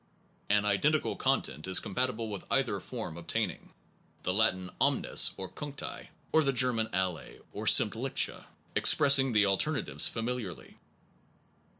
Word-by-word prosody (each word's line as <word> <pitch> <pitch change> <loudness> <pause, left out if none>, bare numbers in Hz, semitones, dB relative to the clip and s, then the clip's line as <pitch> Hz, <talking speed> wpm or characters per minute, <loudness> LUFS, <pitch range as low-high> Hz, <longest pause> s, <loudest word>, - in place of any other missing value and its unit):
An 105 0 +2
identical 145 +10 +1
content 75 +7 -2
is 95 - +2
compatible 120 +1 -2
with 100 -3 -7
either - - +1
form 80 - -7
obtaining, 85 - -3 0.5
the 90 - -1
Latin 95 -3 +1
omnes, - - +3
or 95 - -6
cuncti, 145 +4 -7 0.2
or 160 - +4
the 140 - +1
German 120 -3 0
alle 90 -2 -1 0.3
or - - -6
sdmmtliche - - +2 0.3
expressing 135 -2 +5
the 105 -2 +3
alternatives 95 - +1
famil 120 +2 -3
iarly. 90 -6 -10
110 Hz, 125 wpm, -29 LUFS, 95-130 Hz, 0.5 s, expressing